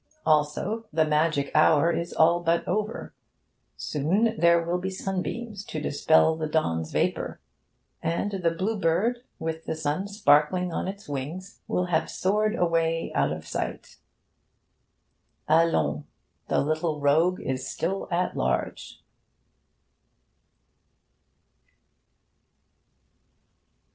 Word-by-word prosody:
Also, 155 +9 +1
the 160 0 +2
magic 150 -2 +1
hour 155 +1 +5
is 170 +1 -3
all 170 +2 +4
but 170 0 0
over. 210 +4 -2 0.6
Soon 195 +11 0
there 170 -3 +4
will 170 +2 -1
be 190 +1 -3
sunbeams 195 +3 -4
to 155 - -5
dispel 160 +2 +3
the 160 -1 -3
dawn's 80 - -1
vapour; - - -1 0.6
and 170 +5 -1
the 185 -4 0
Blue 190 +6 -2
Bird, 195 +8 +1 0.2
with 160 0 -4
the - - -2
sun 155 +5 -2
sparkling 180 -2 +2
on - - -2
its 200 +2 -7
wings, 150 +8 -6
will 180 - 0
have 170 -3 0
soared 210 +3 0
away 165 -3 0
out - - +1
of - - -6
sight. - - -5 1.5
Allons! 155 - +2 0.4
The - - +2
little 155 +1 -1
rogue 160 +6 +3
is 130 0 -3
still 190 +4 -2
at 180 0 -1
large. 65 0 -2
165 Hz, 110 wpm, -26 LUFS, 155-185 Hz, 1.5 s, hour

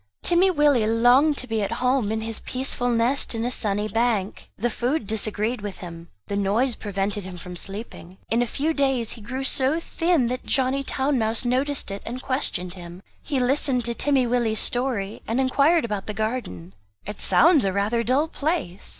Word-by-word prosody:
Timmy 355 +2 +3
Willie 290 -9 +3
longed 245 +6 +4
to 255 - -3
be 225 -2 -1
at 200 +2 -2
home 250 -2 +1
in 220 0 -2
his 225 0 -4
peaceful 255 -1 -2
nest 240 +2 +1
in 225 +1 -2
a 245 - -1
sunny 210 -3 0
bank. 220 -2 -1
The 240 +3 -1
food 245 +3 -1
disagreed 215 +2 -1
with 205 -2 -6
him; 170 -2 -10 0.2
the 200 - -4
noise 210 +6 +1
prevented 200 0 -3
him 185 -1 -8
from 180 +1 -9
sleeping. 195 -1 -8
In 230 +2 +1
a 245 - 0
few 300 +8 -1
days 270 -6 0
he 230 - -7
grew 255 +6 -5
so 270 +4 +1
thin 330 -4 +1
that 250 +1 -4
Johnny 265 +1 +1
Town 270 0 0
mouse 225 +2 -1
noticed 260 -1 0
it, 195 - -5
and 245 +2 -6
questioned 220 -10 -2
him. 175 0 -11 0.2
He 280 -4 -2
listened 255 -1 +1
to 235 - +1
Timmy 270 +1 +2
Willie's 235 -2 0
story 235 -6 -1
and 230 +3 0
inquired 280 +4 +3
about 210 -4 -4
the 210 - -4
garden. 215 - -4 0.3
"It 210 +1 -5
sounds 330 -4 +6
rather 200 +4 0
a - - 0
dull 265 +6 +2
place? 295 - -3
235 Hz, 190 wpm, -24 LUFS, 205-265 Hz, 0.3 s, sounds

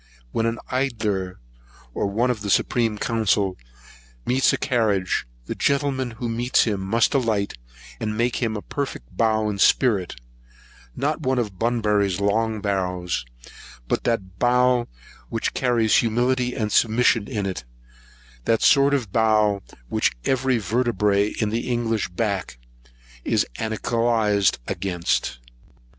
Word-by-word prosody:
When 115 - 0
an 115 0 -1
edilleer, 110 -8 -1 0.6
or - - -1
one 115 +6 +1
of 110 -4 -4
the 100 - -4
supreme 115 +1 +1
council, 105 -4 +1 0.7
meets 130 +2 +3
a - - 0
carriage, 110 - 0 0.2
the - - -3
gentleman 140 -2 0
who 120 - -3
meets 120 +2 +2
him 105 -4 -1
must 110 +5 +1
alight, 110 -7 0 0.5
and 110 0 -3
make 120 +1 +1
him 110 -3 -1
a 105 - -7
perfect 135 - -5
bow 110 -1 +2
in 100 -2 -3
spirit; 100 -5 +3 0.8
not - - -1
one 130 0 0
of 105 -7 -2
Bunburry's 105 -5 +1
long 110 +2 0
bows, 90 - -2 0.6
but - - -1
that 95 -6 -2
bow 125 0 +3 0.4
which 115 - -2
carries 120 -4 +2
humility 125 +2 +1
and 105 -1 -2
submission 115 -1 +3
in 105 -6 -3
it, 95 -8 -4 0.8
that 115 - +2
sort 140 0 +5
of 120 -8 -3
bow 105 -2 +3 0.3
which - - +1
every 130 -1 +2
vertebræ 105 -2 +1
in 110 - +1
an - - -1
English 120 -2 -1
back 95 - -2 0.7
is - - +1
anchylosed 110 -2 +1
against. 85 -9 -1
110 Hz, 130 wpm, -23 LUFS, 100-120 Hz, 0.8 s, sort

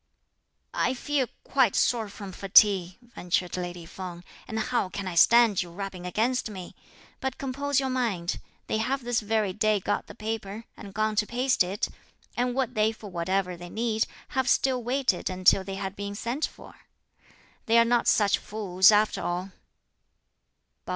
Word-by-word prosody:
"I 265 - +1
feel 275 0 0 0.2
quite 260 -7 +2
sore 225 -4 +1
from 200 -1 -8
fatigue," 190 -1 +4 0.2
ventured 180 0 -1
lady 175 -1 -5
Feng, 175 0 -8 0.2
"and 220 - -4
how 240 -4 0
can 195 0 -5
I 185 - -3
stand 230 +3 +5
your 175 -2 -8
rubbing 190 -1 -6
against 230 +6 0
me? 185 -4 -8 0.5
but 265 -1 -3
compose 280 +1 -1
your 265 -1 -1
mind. 215 -9 -1 0.3
They 220 - -1
have 265 +4 -1
this 240 -1 +1
very 215 -2 0
day 215 +1 +2
got 190 - -2
the - - -11
paper, 220 0 -5
and 200 - -10
gone 215 0 0
to 210 - +2
paste 250 -2 +2
it; 190 +3 -2 0.5
and 245 0 0
would 260 -2 0
they, 215 -1 +2
for 215 -2 -11
whatever 180 +1 -1
they 175 0 -10
need, 220 +2 0 0.2
have 260 -1 0
still 260 -2 +2
waited 250 -6 0
until 185 +1 +4
they 195 0 -6
had 195 0 -4
been 200 0 -5
sent 240 +8 -2
for? - - -14 0.9
they 230 +1 +4
are 230 - +6
not 240 0 +2
such 205 -2 +4
fools 195 -2 +3
after 210 +1 +2
all!" 180 +2 -3
215 Hz, 165 wpm, -27 LUFS, 190-240 Hz, 0.9 s, are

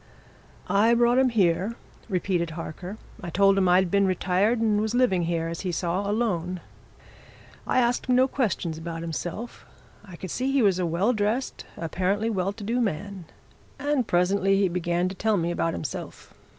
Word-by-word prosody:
"I 220 +4 +4
brought 240 +1 +4
him 265 -1 +4
here," 195 0 +1 0.3
repeated 180 -2 0
Harker. 175 +5 -6 0.2
"I 175 - -5
told 195 +3 +4
him 190 -2 +3
I'd 180 0 +4
been 200 -1 +3
retired 190 +5 +1
and 215 -2 +2
was 220 +2 -1
living 190 -9 +2
here, 165 -1 -1
as 165 0 -5
he 185 - -2
saw, 180 +4 -1
alone. 185 -5 -1 1.1
I - - +1
asked 240 +1 0
him 250 - +3
no 260 +1 +5
questions 185 - -2
about 165 0 -5
himself 175 +7 -5 0.4
I 190 -4 -11
could 185 0 -7
see 260 +2 -1
he 270 -3 +3
was 190 -3 +3
a 180 - 0
well 185 +9 +1
dressed, 220 +4 -2
apparently 190 +6 -1
well 190 -2 0
to 205 +1 -10
do 235 +4 0
man. 200 -2 -3 0.5
And 285 -4 0
presently 195 +2 +2
he 195 -2 +3
began 175 0 0
to 185 - -4
tell 215 +2 +1
me 170 -1 0
about 165 -1 -1
himself. 135 -8 -7
195 Hz, 175 wpm, -26 LUFS, 175-225 Hz, 1.1 s, no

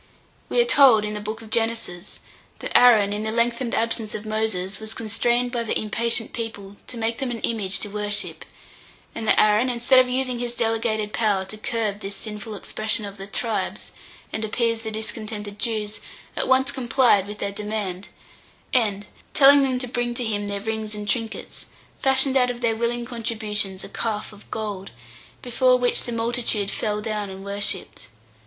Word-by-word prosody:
We - - +2
are 480 - +6
told 270 - +6
in 210 - -3
the 210 - -3
book 215 +2 -5
of 220 - -13
Genesis, 225 -5 -2 0.4
that - - -6
Aaron, 215 -5 +7
in 210 - -2
the 220 - -2
lengthened 235 +1 0
absence 225 -1 -1
of 210 - -6
Moses, 215 -3 -2
was 220 0 -6
constrained 240 +2 0
by 240 -1 -1
the 230 - 0
impatient 230 +1 0
people 205 -4 -6
to 245 - -7
make 225 0 -1
them 265 -2 -1
an 235 -1 -4
image 195 -4 0
to - - -3
worship; 205 0 -2 0.7
and 220 - -5
that - - +5
Aaron, 215 +4 +4
instead 245 +2 +4
of 255 -1 +4
using 255 -1 0
his 240 0 -2
delegated 225 -2 0
power 205 -4 +1
to 195 - -10
curb 215 -1 -2
this 200 -1 -6
sinful 210 +1 -6
expression 215 +2 0
of 200 0 -8
the 195 0 -8
tribes, 225 +2 -3 0.4
and 220 - -2
appease 230 +1 0
the 220 - -4
discontented 215 -1 -4
Jews, 215 -3 -2 0.4
at - - -1
once 260 0 +3
complied 240 -5 +3
with 210 0 -7
their 200 - -2
demand, 205 -2 -4 0.7
and, 210 -5 +2 0.3
telling 280 0 +8
them 260 -2 +1
to 250 0 -4
bring 240 0 -2
to 245 - -1
him 205 -2 -1
their 200 0 -3
rings 220 0 -3
and 210 0 -6
trinkets, 225 -1 -3 0.3
fashioned 265 0 +3
out 250 -1 +4
of 245 0 -5
their 230 -2 +2
willing 235 +1 -1
contributions 215 -5 -2
a - - -8
calf 215 -2 -3
of 210 - -17
gold, 205 -3 -4 0.5
before 250 +1 +3
which 245 -1 +2
the 240 - -4
multitude 230 -3 -1
fell 210 -1 -2
down 210 -2 -3
and 190 +1 -9
worshipped. 200 - -3
220 Hz, 180 wpm, -24 LUFS, 210-240 Hz, 0.7 s, telling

